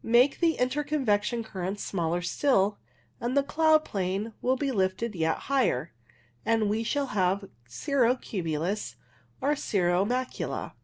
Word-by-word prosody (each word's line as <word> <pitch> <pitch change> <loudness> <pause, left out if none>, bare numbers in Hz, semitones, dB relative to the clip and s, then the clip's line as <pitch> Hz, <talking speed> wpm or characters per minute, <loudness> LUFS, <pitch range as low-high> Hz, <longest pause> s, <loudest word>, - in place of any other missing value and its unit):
Make 245 +4 +4
the 335 -2 +3
interconvection 250 -5 0
currents 195 -1 -4
smaller 175 -1 -1
still, 205 0 +2 0.4
and 245 +3 -1
the 280 - +5
cloud 310 +1 +3
plane 195 +3 -2
will 255 +1 +2
be 275 +1 -1
lifted 195 +1 0
yet 160 -3 0
higher, 250 - +1 0.5
and 225 -2 +2
we 220 +2 0
shall 280 +5 0
have 195 0 +1 0.2
cirro 250 - +1
cumulus 170 - -3 0.5
or 290 +3 +2
cirro 180 -8 +1
macula. 250 +4 -2
220 Hz, 135 wpm, -28 LUFS, 185-260 Hz, 0.5 s, the